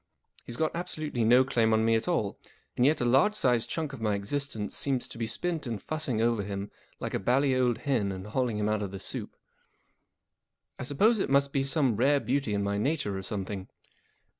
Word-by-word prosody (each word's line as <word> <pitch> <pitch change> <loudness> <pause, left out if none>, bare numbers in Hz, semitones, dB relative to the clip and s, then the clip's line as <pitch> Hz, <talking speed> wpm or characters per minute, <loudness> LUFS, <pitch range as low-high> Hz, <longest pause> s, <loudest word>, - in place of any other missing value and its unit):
He's 120 - -6
got 160 0 0
absolutely 155 -8 -3
no 125 +3 +6
claim 115 -4 +2
on 110 0 +3
me 115 - +3
at 110 0 0
all, 110 - -1 0.4
and 125 - +2
yet 155 -1 +2
a - - +1
large 135 - +4
sized 125 - +2
chunk 155 -4 -3
of 130 - -8
my 105 -2 +1
existence 105 +1 -3
seems 135 -3 0
to - - -11
be 115 - -1
spent 160 +6 -2
in 115 -2 -2
fussing 140 0 -2
over 115 -1 +2
him 100 0 -5 0.3
like - - -4
a - - 0
bally 130 +6 +2
old 125 -3 +2
hen 120 -6 0
and 95 0 -6
hauling 115 0 -1
him 105 0 0
out 105 -1 0
of 100 - -3
the 95 0 -7
soup. - - -5 1.4
I - - -3
suppose 210 - +3
it - - 0
must 140 0 +3
be 135 - +2
some 135 -4 +2
rare 140 +4 +4
beauty 135 -5 -1
in 100 - 0
my 100 0 -1
nature 120 -5 0
or 95 - -3
something. 95 -1 -4
120 Hz, 215 wpm, -29 LUFS, 105-140 Hz, 1.4 s, no